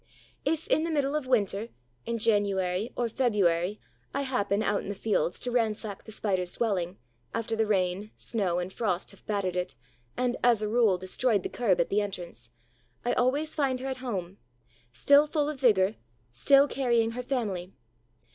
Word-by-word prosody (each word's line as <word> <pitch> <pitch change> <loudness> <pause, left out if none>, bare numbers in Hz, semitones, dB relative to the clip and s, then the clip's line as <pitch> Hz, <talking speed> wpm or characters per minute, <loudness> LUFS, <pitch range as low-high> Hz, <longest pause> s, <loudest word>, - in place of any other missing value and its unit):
If, 315 +2 0
in 315 - +3
the 335 - -1
middle 290 -2 0
of 300 -4 -2
winter, 215 -3 +1 0.4
in 235 - -1
January, 205 -2 +1
or 240 - 0
February, 205 -6 +1 0.4
I 280 - 0
happen, 215 -6 0
out 205 -1 +1
in - - -7
the 205 - -3
fields, 200 -4 0
to 250 - -2
ransack 220 -4 -1
the 220 - -10
Spider's 185 -4 -1
dwelling, 190 -6 -1 0.4
after 230 0 -1
the 220 -1 +1
rain, 190 0 0
snow, 195 -7 -1
and 180 +1 -3
frost 190 -6 -1
have 200 - -19
battered 200 -4 -1
it 180 0 -2 0.4
and, 250 -1 0
as 235 -3 +4
a - - 0
rule, 220 -4 +3
destroyed 195 +3 +1
the - - -3
curb 215 -7 +1
at 170 - +2
the 205 +1 +2
entrance, 175 - -6 0.6
I 245 - +2
always 285 +5 +1
find 270 -4 0
her 265 - -4
at 260 - -3
home, 200 -8 -5 0.5
still 285 - +5
full 295 -1 0
of 300 -3 -4
vigor, 205 -4 +4 0.3
still 275 - +5
carrying 235 -5 +1
her 245 +2 -4
family. 205 -9 -3
215 Hz, 175 wpm, -28 LUFS, 190-250 Hz, 0.6 s, still